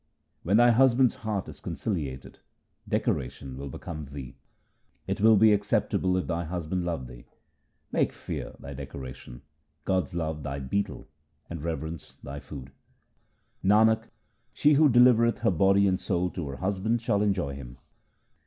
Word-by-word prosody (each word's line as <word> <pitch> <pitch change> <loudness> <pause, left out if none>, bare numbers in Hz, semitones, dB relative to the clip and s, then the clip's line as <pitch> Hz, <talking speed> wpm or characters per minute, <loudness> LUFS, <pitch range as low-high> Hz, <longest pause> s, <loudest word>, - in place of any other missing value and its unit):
When 100 +5 +2
thy 120 +1 +6
Husband's 130 +1 +4
heart 110 -4 -3
is - - -10
conciliated, 70 - -4 0.5
decoration 65 +1 -2
will 70 +1 -6
become 75 +3 -7
thee. 70 -3 -9 0.7
It 95 +2 -3
will 110 +1 +7
be 110 +1 +6
acceptable 100 -2 +1
if 90 - -1
thy 85 0 -2
Husband 90 +1 -3
love 85 -7 -3
thee. - - -12 0.7
Make - - +1
fear - - -6
thy 70 - -9
decoration, 65 -2 -9 0.4
God's 95 -1 0
love 80 -2 -2
thy 70 0 -4
betel, 70 +3 -3 0.4
and 85 -3 -5
reverence 80 -1 -5
thy 70 +1 -6
food. 70 -2 -10 0.9
Nanak, 110 +3 +4 0.4
she 150 0 +4
who 150 +1 +6
delivereth 120 -1 +5
her 115 - +3
body 95 +3 +4
and 95 -1 +2
soul 90 -1 -1
to 85 -5 -5
her 70 - -5
Husband 100 +6 0
shall 110 -3 +1
enjoy 95 -9 0
Him. 65 -2 -9
90 Hz, 145 wpm, -27 LUFS, 70-105 Hz, 0.9 s, will